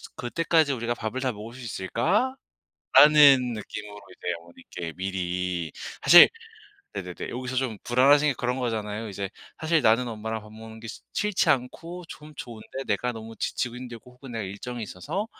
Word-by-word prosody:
그때까지 155 +3 +1
우리가 120 -1 -2
밥을 120 +3 -4
다 130 -1 0
먹을 110 +1 -9
수 130 - -10
있을까?"라는 190 - -1 1.0
느낌으로 105 -1 -7 0.2
이제 90 - -2
어머니께 85 0 -9
미리. 90 -3 -2 0.3
사실 175 - +10 0.7
네네네. - - -6
여기서 130 +1 -4
좀 125 -5 -1
불안하신 140 +5 +5
게 145 - +1
그런 125 +1 -1
거잖아요. 110 -3 -3
이제 100 -1 -5 0.3
사실 160 0 +2
나는 115 +3 +4
엄마랑 110 0 -4
밥 105 - -14
먹는 110 0 -11
게 115 - -9
시 120 - -8
싫지 210 -5 +1
않고 165 +6 -1
좀 150 0 -11
좋은데 120 +3 -7
내가 120 +4 0
너무 115 0 -9
지치고 125 -1 -2
힘들고 125 -1 -10
혹은 125 0 -12
내가 115 -2 -3
일정이 115 +5 -6
있어서 150 - -4
120 Hz, 360 characters per minute, -26 LUFS, 105-135 Hz, 1.0 s, 사실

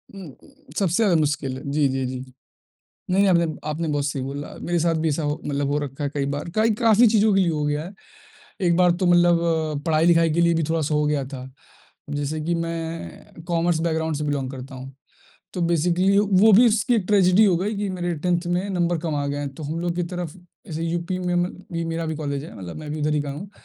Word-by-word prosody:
उम, 185 -6 -9
उ 285 0 -21
सबसे 180 -3 +1
ज़्यादा 185 -5 +3
मुश्किल 145 -3 -1
है, - - -9
जी, 145 -1 +2
जी, 130 0 -1
जी। 130 0 -5 0.9
नहीं, 195 +2 +4
आपने 170 -2 +4 0.2
आपने 160 +2 -2
बहुत 145 -1 0
सही 140 -2 -2
बोला, 140 +2 -6
मेरे 175 0 0
साथ 165 0 +1
भी 160 - +1
ऐसा 150 +2 -1
हो 145 +1 -1
मतलब 140 -1 -1
हो 145 - +1
रखा 145 0 -5
है 140 - 0
कई 140 -1 -1
बार, 150 +4 -5
काई 220 +1 +3
काफ़ी 225 +1 +6
चीज़ों 215 -1 +3
के - - +4
लिए 180 -3 +3
हो 150 -1 -2
गया 150 +1 -1
है। 190 - -9 0.7
एक 170 - +3
बार 180 -1 +5
तो - - +3
मतलब 175 -1 +5 0.5
पढ़ाई-लिखाई 165 +1 +4
के 170 - +2
लिए 170 0 +4
भी 165 - 0
थोड़ा-सा 155 -2 0
हो 150 - +2
गया 145 -2 0
था, 130 -1 -6 0.6
जैसे 145 +2 -3
कि 170 +3 -1
मैं 165 0 -7
कॉमर्स 170 -1 +1
बैकग्राउंड 160 -1 -1
से 150 - -3
बिलॉन्ग 140 -3 -2
करता 135 +1 -9
हूँ, 130 +1 -9 0.6
तो 180 - -3
बेसिकली 175 +4 +2
वो 205 +1 +5
भी 230 +5 +7
उसकी 215 +2 +1
एक 210 -5 +1
ट्रेजेडी 195 0 +5
हो 185 -5 +4
गई 205 +4 -2
कि 205 0 -2
मेरे 175 -1 -2
10th 175 0 +1
में 180 +3 -1
नंबर 175 -2 0
कम 160 -1 -3
आ 145 0 -1
गए 145 0 -2
हैं, 145 -1 -3
तो 155 - -9
हम 155 +3 -3
लोगों 175 0 -1
की 175 - 0
तरफ, 175 -3 -4 0.3
ऐसे 160 0 -5
यूपी 170 +2 -2
में 180 -1 -1
म 175 +1 +1 0.2
भी 165 0 -2
मेरा 165 0 -3
भी 160 - -3
कॉलेज 140 -2 -3
है 160 - -11
मतलब 90 -3 -7
मैं 150 -1 -7
भी 155 - -4
उधर 150 0 +1
ही 150 - +1
का 145 - -5
हूँ। 165 +8 -7
165 Hz, 240 wpm, -23 LUFS, 150-180 Hz, 0.9 s, भी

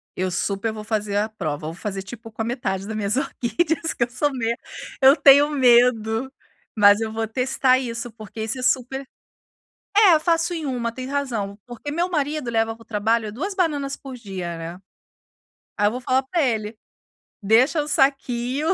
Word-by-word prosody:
Eu 185 0 -1
super 200 +4 -1
vou 215 -1 -7
fazer 210 -2 -2
a 215 +2 0
prova, 155 -7 -4
vou 160 - -5
fazer, 195 +2 -5
tipo, 225 +2 -10
com 220 - -6
a 225 - -1
metade 195 -6 -3
da 220 - -5
minhas 210 +1 0
orquídeas, 320 +6 -1
que 235 - 0
eu 235 - -2
sou 290 +4 0
me 235 -2 -1 0.5
eu 270 +1 +8
tenho 285 0 +6
medo, 245 -2 +3 0.4
mas 205 0 +6
eu 225 -1 -3
vou 225 0 -2
testar 255 +2 +2
isso, 240 -1 -5
porque 220 0 -8
isso 220 +4 -3
é - - -5
super 265 +1 0 0.9
é, 390 -7 +7
faço 335 +1 +1
em 325 -2 -4
1, 240 -3 -2
tem 255 +1 -7
razão, 235 -8 -3
porque 245 +4 -7
meu 340 +4 0
marido 300 -5 -2
leva 225 -1 0
para 230 - -17
o - - -18
trabalho 220 0 0
2 370 - -4
bananas 290 -7 -1
por 270 -2 -10
dia, 190 -7 -6
né. 165 +2 -7 1.0
Aí 205 - +2
eu - - +3
vou 250 - -4
falar 260 +1 +1
para 330 +5 0
ele: 220 -4 -1 0.7
"Deixa 240 +9 +3
o 290 - -5
saquinho 270 -1 0
240 Hz, 185 wpm, -22 LUFS, 215-275 Hz, 1.0 s, eu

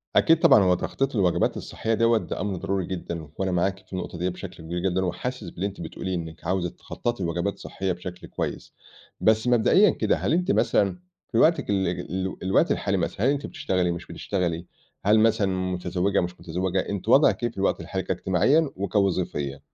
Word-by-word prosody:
أكيد 165 -1 +5
طبعًا 105 - +6
هو 90 -1 +4
تخطيط 135 +8 -2
الوجبات 90 -5 +2
الصحّية 115 - -3
دوّة 115 +1 +4
ده - - -4
أمر 100 -2 -2
ضروري 95 +1 -2
جدًا 85 -3 -5
وأنا 95 -1 -1
معاكِ 95 +2 0
في - - -15
النقطة 90 -1 -4
ديّه 90 +2 0
بشكل 90 -2 -8
كبير 85 +2 -3
جدًا 95 +1 0
وحاسس 125 +8 -4
باللي 95 - -4
أنتِ 100 -3 -5
بتقوليه 90 +3 -4
إنِّك 80 -1 -7
عاوزة 90 0 0
تخطَّطي 120 +4 -4
لوجبات 85 +4 -1
صحّية 95 -1 -3
بشكل 90 0 -7
كويس. - - -5 0.5
بس 110 +2 +3
مبدئيًا 125 - +5
كده، - - +1
هل - - 0
أنتِ 180 +3 +2
مثلًا 95 -3 +2 0.3
في - - 0
وقتِك - - +3
ال 95 -2 +1
ال 95 +2 -3
الوقت 95 +1 +3
الحالي - - 0
مثلًا، 105 - -1
هل 135 - +5
أنتِ 145 0 -2
بتشتغلي، 95 -10 -1
مش 85 - -5
بتشتغلي؟ 90 -3 -2 0.4
هل 105 +2 +5
مثلًا 110 -2 +3 0.3
متزوّجة، 90 +2 0
مش 90 0 -5
متزوّجة؟ 90 +3 -1
أنتِ 100 +1 -3
وضعِك 135 0 +5
إيه 120 - +2
في - - -23
الوقت 95 - +1
الحالي 95 -1 -3
كاجتماعيًا 95 - +2
وكوظيفيًا؟ 90 -8 -1
95 Hz, 185 wpm, -25 LUFS, 90-105 Hz, 0.5 s, طبعًا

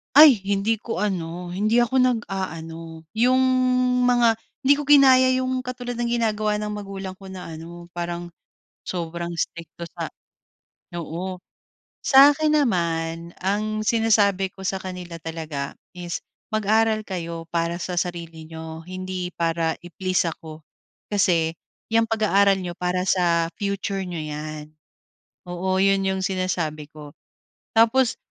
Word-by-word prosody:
Ay, 290 -7 +9
hindi 205 +2 +1
ko 225 -4 -4
ano, 175 -3 -3
hindi 215 +6 +2
ako 260 +2 +2
nag-a-ano, 165 -9 -2
yung 255 +3 +4 0.7
mga 235 -2 +4 0.3
hindi 275 - +6
ko 295 - -3
ginaya 265 -3 +7
yung 255 0 -1
katulad 245 -1 -5
ng 235 0 0
ginagawa 215 -2 +1
ng 210 0 -3
magulang 195 -2 -6
ko 195 0 -12
na 180 -3 -8
ano, 170 +2 -10
parang 175 0 -4 0.6
sobrang 170 -1 -4
istrikto 170 0 -5
sa - - -4 0.9
Oo. 175 +3 -4 0.7
Sa 275 +1 +8
akin 310 0 +1
naman, 170 - 0
ang 215 +3 -1
sinasabi 205 -4 +3
ko 190 - -11
sa 190 - 0
kanila 180 -2 -7
talaga 155 -4 -5 0.2
is, 175 -1 -4 0.3
"Mag-aral 220 +1 +2
kayo 170 -3 -5
para 170 0 -1
sa 180 0 -3
sarili 170 -2 -5
niyo, 160 0 -8
hindi 185 -1 -4
para 165 -1 0
i-please 180 0 -1
ako. 160 -1 -10 0.5
Kasi 175 -5 +2 0.4
yung 230 0 +4
pag-aaral 200 -3 +3
n'yo 175 -1 -5
para 180 +1 -1
sa 170 -2 +2
future 200 -1 -2
n'yo 175 -3 -4
'yan." 155 0 -6 0.8
Oo, 185 +2 -1
yun, 195 0 +3
yung 190 0 0
sinasabi 180 -6 -2
ko. 150 -1 -11 0.6
Tapos 230 +2 +4
185 Hz, 130 wpm, -23 LUFS, 170-215 Hz, 0.9 s, Ay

